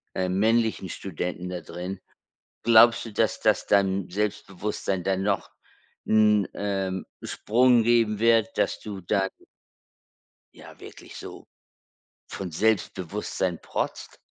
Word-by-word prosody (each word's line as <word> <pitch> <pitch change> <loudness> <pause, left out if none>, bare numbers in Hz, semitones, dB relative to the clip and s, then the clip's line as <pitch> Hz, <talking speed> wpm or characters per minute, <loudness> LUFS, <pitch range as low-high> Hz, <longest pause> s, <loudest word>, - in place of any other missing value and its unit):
äh, 95 0 -1
männlichen 110 +1 +1
Studenten 90 0 -5
da 90 -1 -5
drin, 90 +4 -6 0.6
glaubst 115 0 +6
du, 115 - -8
dass 110 -1 +1
das - - +2
deinem 95 -2 +2
Selbstbewusstsein 100 -1 -3
dann 95 0 0
noch 100 0 -1 0.6
'n, 105 -2 +4
ähm, 95 -2 -2 0.2
Sprung 120 +1 +3
geben 115 -2 +3
wird, 115 0 +3
dass - - 0
du 100 -3 -7
da 95 +2 +1 1.3
ja, - - -14
wirklich - - -12
so - - -10 0.8
von 95 -2 -6
Selbstbewusstsein 95 -1 -1
protzt? - - -4
100 Hz, 115 wpm, -26 LUFS, 95-110 Hz, 1.3 s, glaubst